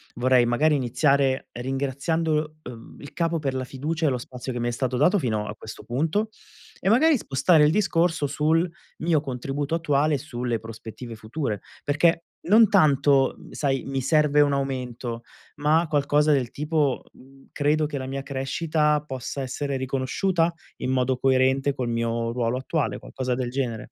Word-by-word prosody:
Vorrei 125 0 +4
magari 150 +6 +2
iniziare 135 +1 +1
ringraziando, 150 +4 -1
uhm, 115 -2 -11
il 145 - -11
capo 165 -1 0
per 135 -3 -2
la 130 - -2
fiducia 155 +6 -3
e - - +4
lo 130 - 0
spazio 125 +1 -7
che 120 - -4
mi 120 - -1
è 120 - 0
stato 125 +1 -2
dato 175 +9 +4
fino 110 - -1
a 105 - -6
questo 110 - -10
punto, 160 - -1 0.5
e 190 - 0
magari, 285 +7 +5
spostare 150 - +3
il 150 - +5
discorso 170 -5 +1
sul 160 +5 +1 0.3
mio 160 -2 +1
contributo 135 +2 -4
attuale 150 -2 +1
sulle 125 -4 -3
prospettive 115 +1 -9
future; 110 -1 -4 0.2
perché 165 +3 +2 0.2
non 220 +1 +7
tanto, 140 -7 +4
mhmm, - - -14
sai, 135 -3 -1
mi 135 -1 -2
serve 150 +1 +3
un 145 -1 +3
aumento, 125 -3 -3 0.3
ma 155 +3 +2
qualcosa 150 +1 +3
del 130 -4 0
tipo, 150 -2 0
mhmm, 135 +1 -19
credo 150 +1 +1
che 145 -1 -4
la 130 - -4
mia 135 +1 -4
crescita 150 +3 0
possa 130 +1 -5
essere 135 +1 -3
riconosciuta? 135 +7 0 0.3
In 130 - -1
modo 130 0 +1
coerente 130 +1 +2
col 125 -2 -3
mio 115 0 -1
ruolo 120 0 0
attuale, 145 +3 -2
qualcosa 130 -1 -3
del 125 -1 -2
genere. 120 -4 -3
135 Hz, 165 wpm, -25 LUFS, 125-155 Hz, 0.5 s, non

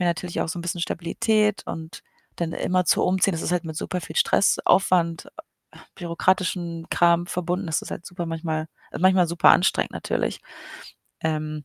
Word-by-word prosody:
mir 180 - +1
natürlich 170 +1 -2
auch - - -1
so 165 - -4
'n - - -5
bisschen 175 0 -3
Stabilität 210 +5 0
und 160 0 -7 0.3
dann 170 -1 -2
immerzu 185 -1 +1
umziehen, 185 +1 +2
das 165 - -3
ist - - -1
halt 180 - +1
mit 160 -1 -6
super 180 +3 -3
viel 160 -1 -9
Stress, - - +3
Aufwand, 175 -3 +2 0.5
äh, - - -16 0.2
bürokratischen 175 -1 -1
Kram 175 0 +3
verbunden. 180 +2 -2
Das 160 -2 -1
ist - - -9
halt 170 - -7
super 175 -1 -5
manchmal 160 -1 -3 0.3
äh, - - -5
manchmal 185 -1 +4
super 170 0 +5
anstrengend 185 - +3
natürlich. - - -2 0.8
Ähm, 155 -1 -2
175 Hz, 175 wpm, -24 LUFS, 165-180 Hz, 0.8 s, super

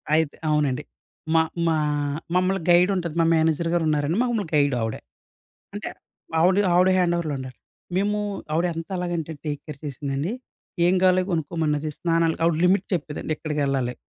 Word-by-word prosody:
అయితే 160 -2 +1
అవునండి. 150 -2 +1 0.5
మా 160 - +6 0.3
మా 160 -1 +2 0.6
మమ్మల్ని 185 +1 +2
గైడ్ 175 +2 +6
ఉంటది, 170 -4 -3
మా - - +3
మేనేజర్ 160 +1 +1
గారు 175 -1 +2
ఉన్నారండి 150 +3 +1
మమ్మల్ని 235 -5 -1
గైడ్ 145 -2 +3
ఆవిడ. 110 -1 -2 0.8
అంటే, - - -4 0.5
ఆవిడ 185 +3 +4 0.2
ఆవిడ 180 +1 +5
హ్యాండోవర్‌లో 170 -4 +1
ఉండాలి. 130 -2 -8 0.4
మేము, 205 +2 +1 0.3
ఆవిడ 165 +3 +2
ఎంతలాగంటే 170 -1 -3
టేక్ 145 -2 -3
కేర్ 150 -3 -8
చేసిందండి. 140 - -3 0.5
ఏం 180 - +4
కావాలో 185 0 +5
కొనుక్కోమన్నది, 155 -2 -1
స్నానాలు 165 -1 +1
ఆవిడ 165 -1 +3
లిమిట్ 190 +1 +2
చెప్పేదండి, 155 -1 -3
ఇక్కడికి 150 -2 -3
వెళ్ళాలి. 130 -3 -1
160 Hz, 145 wpm, -24 LUFS, 150-180 Hz, 0.8 s, మా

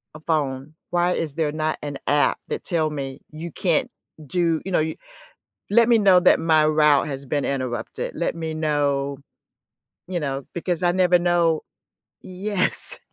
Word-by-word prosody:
a - - -9
phone. 150 -3 -2 0.2
Why 175 0 +2
is 155 -5 -3
there 160 -3 0
not 155 +1 -1
an 145 -1 -5
app 145 0 +2
that - - -3
tell 160 -4 0
me, 135 -3 -6
'You 160 +2 -7
can't 250 - 0 0.4
do'" 165 +2 +1
you 190 - -4
know, 175 - +3
y 160 0 -3 0.7
"Let 230 +2 +5
me 235 -1 +5
know 195 -3 +6
that 180 - +5
my 160 -2 +4
route 150 -2 +4
has 135 -1 -6
been 145 +1 -1
interrupted." 130 -3 -3
Let 170 - -1
me 160 -1 -4
know, 145 -3 0 0.9
you 180 -2 -2
know, 135 -2 -3
because 175 0 -2
I 175 - +4
never 180 -1 +4
know 170 -2 +2 0.6
Yes. 185 +1 -1
160 Hz, 165 wpm, -23 LUFS, 145-175 Hz, 0.9 s, know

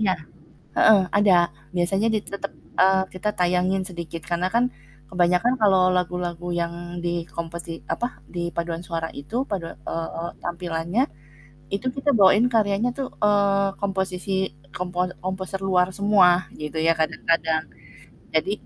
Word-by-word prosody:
Iya, 195 -4 +3 0.6
heeh, 220 -3 +7 0.2
ada 205 -2 +5 0.4
biasanya 195 +5 +2
di - - +3
tetap, 200 0 -5 0.3
eee, 190 0 +5
kita 185 +3 -3
tayangin 180 +1 +2
sedikit, 170 -3 -6
karena 175 +2 +1
kan 240 +1 +4 0.5
kebanyakan 180 +7 +3
kalau 195 -3 +5 0.2
lagu-lagu 175 -1 -2
yang 170 0 -1 0.3
di 175 - +1 0.3
kompeti 170 0 -5 0.2
apa, 240 - -2 0.3
di 170 0 -2
paduan 170 -1 -2
suara 165 -1 -2
itu 145 +11 -6
padua 180 -5 -3
eee, 165 +2 -4
tampilannya 175 +4 -1 0.7
itu 200 +6 -3
kita 280 +2 +1
bawain 200 +5 +6
karyanya 220 -1 +2
tuh, 270 - -2
eee, 200 -1 +3
komposisi 190 -1 -2 0.4
kompo 180 0 -1
komposer 190 0 -3
luar 180 -1 +4
semua 200 -2 +6 0.3
gitu 150 +1 -4
ya, 165 - +6
kadang-kadang 160 0 +1 0.7
jadi 160 +5 +2
180 Hz, 130 wpm, -24 LUFS, 170-200 Hz, 0.7 s, heeh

